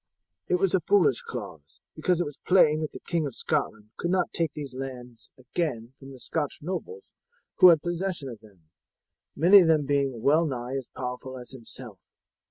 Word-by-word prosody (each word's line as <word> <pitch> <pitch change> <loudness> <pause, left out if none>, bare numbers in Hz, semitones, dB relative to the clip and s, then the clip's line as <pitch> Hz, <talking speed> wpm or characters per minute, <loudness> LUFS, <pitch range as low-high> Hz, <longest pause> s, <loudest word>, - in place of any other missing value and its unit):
It - - +2
was 190 0 +1
a 190 - +4
foolish 165 -7 +3
clause, 100 - -9 0.2
because 175 +2 +1
it 175 - +1
was 145 -1 -8
plain 155 -5 +5
that 155 - -3
the - - -10
King 165 -3 0
of 130 - -8
Scotland 105 0 -2
could 170 - -2
not 185 -1 0
take 165 -3 0
these 140 -4 -7
lands 125 -3 -8
again 130 -3 -3
from 135 0 -11
the 135 - -11
Scotch 150 +2 -3
nobles 420 - -5 0.5
who 185 - +9
had 160 -3 +4
possession 175 -3 -3
of 120 -4 -8
them, 90 -7 -21 0.6
many 180 +7 +7
of 175 - +4
them 155 -3 +3
being 135 -4 0
well 155 +4 +4
nigh 125 -1 -4
as 135 -3 -4
powerful 130 +1 -6
as 125 -1 -10
himself. 120 -4 -10
140 Hz, 185 wpm, -27 LUFS, 125-170 Hz, 0.6 s, who